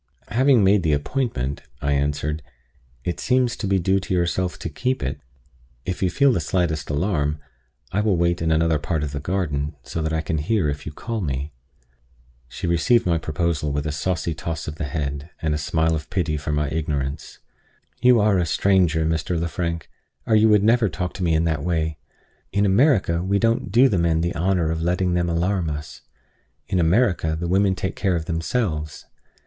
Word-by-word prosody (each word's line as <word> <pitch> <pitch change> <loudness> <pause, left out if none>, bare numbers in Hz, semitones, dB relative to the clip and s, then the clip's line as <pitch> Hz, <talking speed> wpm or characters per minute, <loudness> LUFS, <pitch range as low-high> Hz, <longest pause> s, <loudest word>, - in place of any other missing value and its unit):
"Having 130 -2 +4
made 100 +1 +4
the 80 -3 +1
appointment," 75 - -2 0.2
I 70 - -1
answered, 75 +2 -1 0.6
"it 85 - -3
seems 125 -2 +1
to 105 - -3
be 95 0 +2
due 95 +2 +2
to 95 -1 -2
yourself 90 +1 0
to - - -5
keep 125 - -2
it. 65 - -3 0.6
If 90 - -3
you 95 - +2
feel 140 +6 +3
the - - +1
slightest 80 -2 -1
alarm, 75 -1 0 0.5
I 100 - +1
will 105 -4 +2
wait 85 0 +1
in 80 - +1
another 80 -1 +2
part 80 0 -2
of 75 - -3
the 70 - -4
garden, 75 -4 -2
so 85 - -4
that 80 0 -1
I 80 0 0
can 80 0 -2
hear 90 +2 +1
if 70 +1 -5
you - - -4
call 115 +8 -4
me." 70 -2 -3 0.9
She - - -6
received 85 +8 +3
my 85 -2 +2
proposal 80 -1 -1
with 70 +1 -2
a 75 - -1
saucy 85 +2 -1
toss 80 0 -5
of 75 0 -5
the 80 - -3
head, 70 0 -4
and 80 -1 0
a - - 0
smile 80 +2 +1
of 80 -1 -4
pity 85 -5 -1
for 75 0 -3
my 75 0 0
ignorance. 75 -2 -3 0.6
"You 125 -2 +6
are 105 -2 +3
a 85 - +1
stranger, 85 -2 +2
Mr. 80 +1 -1
Lefrank, 85 0 -3 0.4
or 110 - 0
you 110 +1 +5
would 105 -2 +5
never 115 0 +4
talk 90 -1 -4
to 95 - -5
me 80 -2 +2
in 80 - +2
that 80 -4 -1
way. 80 -2 -1 0.5
In 100 0 +2
America, 100 - +3
we 95 +2 +1
don't 115 +2 +1
do 125 +4 +6
the 100 -8 +1
men 80 -1 +2
the 85 +1 -1
honor 85 -1 +1
of 80 0 -2
letting 90 +1 +1
them 85 0 +1
alarm 85 +1 0
us. 75 0 -6 0.7
In 95 - 0
America, 85 -3 +2
the 85 - -2
women 95 +2 +2
take 95 - -3
care 95 -4 0
of 80 -1 -2
themselves. 80 -2 -2
85 Hz, 200 wpm, -23 LUFS, 75-95 Hz, 0.9 s, You